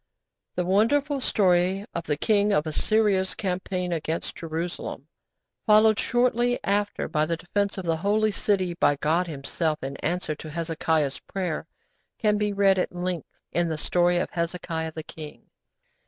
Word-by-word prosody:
The 180 - 0
wonderful 270 +9 +2
story 190 -2 +2
of 170 0 -4
the 150 - -1
King 205 +3 +3
of 160 -6 +2
Assyria's 195 +3 +1
campaign 180 -2 -2
against 160 0 -3
Jerusalem, 165 +1 -5 0.6
followed 215 0 +6
shortly 245 0 +2
after 205 +1 0
by 155 0 +1
the 165 0 -1
defence 200 +5 -1
of 190 - -4
the 165 -1 +1
Holy 210 +5 +2
City 190 -3 0
by 145 -4 +3
God 160 +5 +1
Himself 155 +1 -2
in 135 +1 -4
answer 170 -1 -2
to 155 +1 -9
Hezekiah's 160 -3 -1
prayer, 175 -5 -4 0.5
can 210 -1 +2
be 210 0 +1
read 195 -1 +3
at - - 0
length 175 -2 -3 0.2
in 175 -1 +1
the 160 - -2
story 175 +2 +2
of - - -1
'Hezekiah 170 -2 -3
the 160 - -6
King.' 155 -1 -10
180 Hz, 155 wpm, -26 LUFS, 160-205 Hz, 0.6 s, followed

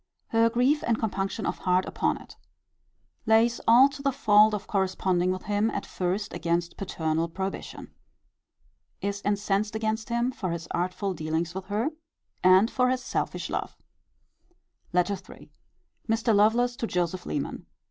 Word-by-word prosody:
Her 230 0 +4
grief 250 +6 +2
and 230 -1 +2
compunction 195 -1 -2
of - - -2
heart 185 0 +2
upon - - -1
it. - - -14 0.9
Lays 225 +2 +4
all 240 +4 +8
to 280 0 -9
the 275 0 +1
fault 215 -5 +5
of 205 -1 -6
corresponding 185 -2 0
with 185 0 -4
him 210 +1 +1
at - - -4
first 190 +3 -2
against 170 0 -1
paternal 165 -3 -2
prohibition. 190 +3 -6 1.1
Is 200 0 -2
incensed 205 +1 0
against 220 +1 -2
him 235 +2 0
for 190 -7 -4
his 170 0 -4
artful 185 +3 -1
dealings 160 +1 -2
with 190 0 -6
her, 210 +9 -1 0.5
and 185 +4 +6
for 250 -1 +2
his 255 0 -1
selfish - - -2
love. - - -4 1.1
LETTER 180 +2 +1 0.2
III. - - -17 0.6
Mr. 225 0 +2
Lovelace 230 +4 +3
to 230 - -2
Joseph 180 -1 -2
Leman. 145 - -4
205 Hz, 145 wpm, -27 LUFS, 185-225 Hz, 1.1 s, all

